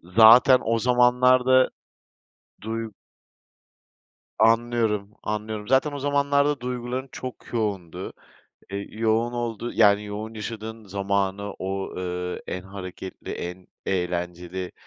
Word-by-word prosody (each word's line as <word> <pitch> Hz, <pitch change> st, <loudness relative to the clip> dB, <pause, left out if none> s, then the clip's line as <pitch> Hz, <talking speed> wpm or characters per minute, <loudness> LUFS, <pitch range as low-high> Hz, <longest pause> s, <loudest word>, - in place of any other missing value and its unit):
Zaten 120 Hz, +3 st, +8 dB
o 115 Hz, 0 st, +1 dB
zamanlarda. 125 Hz, +1 st, +4 dB, 0.9 s
Duy 115 Hz, +1 st, -4 dB, 1.5 s
Anlıyorum, 115 Hz, -2 st, +2 dB
anlıyorum. 105 Hz, 0 st, -4 dB
Zaten 135 Hz, +3 st, +3 dB
o 145 Hz, -, -5 dB
zamanlarda 140 Hz, 0 st, +2 dB
duyguların 125 Hz, +1 st, -4 dB
çok 130 Hz, -1 st, -8 dB
yoğundu. 100 Hz, -7 st, -3 dB, 0.6 s
Eee, 100 Hz, 0 st, -4 dB
yoğun 115 Hz, +2 st, +1 dB
olduğu 120 Hz, -1 st, -3 dB
yani 100 Hz, 0 st, +4 dB
yoğun 105 Hz, +2 st, -6 dB
yaşadığın 110 Hz, 0 st, -6 dB
zamanı 100 Hz, +1 st, -1 dB
o, 95 Hz, +1 st, -3 dB
ııı, 90 Hz, 0 st, -3 dB
en 90 Hz, -, -4 dB
hareketli, 95 Hz, -1 st, -8 dB
en 90 Hz, +1 st, -6 dB, 0.2 s
eğlenceli 90 Hz, 0 st, -3 dB
110 Hz, 100 wpm, -25 LUFS, 95-125 Hz, 1.5 s, Zaten